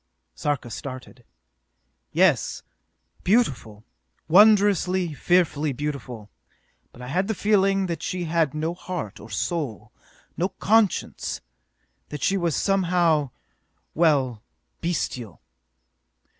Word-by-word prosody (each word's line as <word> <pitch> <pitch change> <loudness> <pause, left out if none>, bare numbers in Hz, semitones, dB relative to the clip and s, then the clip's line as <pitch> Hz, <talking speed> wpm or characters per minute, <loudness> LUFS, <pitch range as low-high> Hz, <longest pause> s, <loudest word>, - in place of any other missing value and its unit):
Sarka 140 -5 -2
started. 130 -1 -8 0.9
"Yes. - - +2 0.6
Beautiful! 135 - +1 0.4
Wondrously, 190 -2 +4
fearfully 155 -3 +1
beautiful: 125 -6 -6 0.6
but 125 - -12
I - - -7
had 185 +8 0
the 220 - -1
feeling 195 -1 +2
that 170 -3 -4
she 180 +1 -3
had 160 -3 0
no 160 +2 -1
heart 175 - -6
or 110 - -12
soul, 130 - -3 0.4
no 180 +3 0
conscience: 215 -1 0 0.7
that 150 -3 -6
she 195 - +2
was 170 -5 0
somehow 175 -6 +2 0.6
well, 140 -9 +2 0.4
bestial!" 125 - -3
165 Hz, 100 wpm, -24 LUFS, 135-185 Hz, 0.9 s, Wondrously